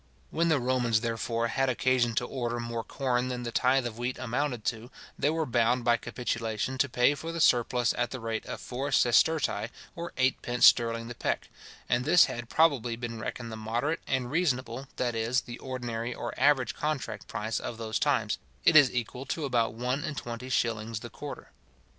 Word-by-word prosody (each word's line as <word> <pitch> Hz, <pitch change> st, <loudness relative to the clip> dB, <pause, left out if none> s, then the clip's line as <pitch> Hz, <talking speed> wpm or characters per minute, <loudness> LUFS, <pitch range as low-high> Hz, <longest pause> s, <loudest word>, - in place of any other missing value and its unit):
When 170 Hz, +1 st, +1 dB
the 155 Hz, -3 st, +3 dB
Romans, 120 Hz, -3 st, +1 dB
therefore, 115 Hz, 0 st, -1 dB
had 135 Hz, +2 st, +1 dB
occasion 125 Hz, -2 st, +2 dB
to 120 Hz, -, +1 dB
order 120 Hz, -2 st, -3 dB
more 115 Hz, -1 st, -3 dB
corn 130 Hz, -2 st, -1 dB
than 125 Hz, -1 st, -3 dB
the 120 Hz, -, -4 dB
tithe 130 Hz, +2 st, +2 dB
of 115 Hz, -1 st, -5 dB
wheat 125 Hz, +1 st, -2 dB
amounted 125 Hz, -1 st, -2 dB
to, 120 Hz, 0 st, -2 dB, 0.3 s
they 145 Hz, -, +1 dB
were 160 Hz, 0 st, 0 dB
bound 120 Hz, -1 st, +2 dB
by 120 Hz, -1 st, +4 dB
capitulation 115 Hz, +1 st, -3 dB
to 140 Hz, -, +2 dB
pay 125 Hz, +3 st, +3 dB
for 160 Hz, +3 st, -6 dB
the 170 Hz, -, -4 dB
surplus 120 Hz, -4 st, +3 dB
at 120 Hz, 0 st, 0 dB
the 130 Hz, -, -6 dB
rate 115 Hz, -1 st, -3 dB
of -, -, -5 dB
four 135 Hz, +3 st, -4 dB
sestertii, 125 Hz, -2 st, +3 dB, 0.3 s
or 170 Hz, 0 st, -5 dB
eightpence 125 Hz, -2 st, +2 dB
sterling 115 Hz, -1 st, +4 dB
the 120 Hz, -, -6 dB
peck; -, -, -2 dB, 0.4 s
and 120 Hz, 0 st, +1 dB
this 175 Hz, +6 st, +6 dB
had 120 Hz, -1 st, -6 dB
probably 135 Hz, -8 st, +3 dB
been 115 Hz, -1 st, -5 dB
reckoned 115 Hz, +1 st, -5 dB
the -, -, -5 dB
moderate 120 Hz, +9 st, -1 dB
and 130 Hz, -2 st, -1 dB
reasonable, 130 Hz, -6 st, -1 dB
that 120 Hz, -1 st, -1 dB
is, 115 Hz, +3 st, +1 dB
the 120 Hz, -1 st, -9 dB
ordinary 120 Hz, -2 st, -4 dB
or -, -, -5 dB
average 135 Hz, -3 st, +3 dB
contract 150 Hz, -2 st, -3 dB
price 110 Hz, 0 st, -2 dB
of 115 Hz, -, -5 dB
those 110 Hz, -1 st, -2 dB
times; -, -, +1 dB, 0.3 s
it -, -, +6 dB
is 145 Hz, -5 st, +8 dB
equal 125 Hz, +2 st, -4 dB
to 155 Hz, +1 st, -2 dB
about 120 Hz, -4 st, +1 dB
one 125 Hz, +5 st, -1 dB
and 155 Hz, -4 st, -4 dB
twenty 120 Hz, +2 st, -6 dB
shillings 115 Hz, -3 st, -1 dB
the -, -, -8 dB
quarter. -, -, -8 dB
120 Hz, 190 wpm, -29 LUFS, 115-130 Hz, 0.4 s, is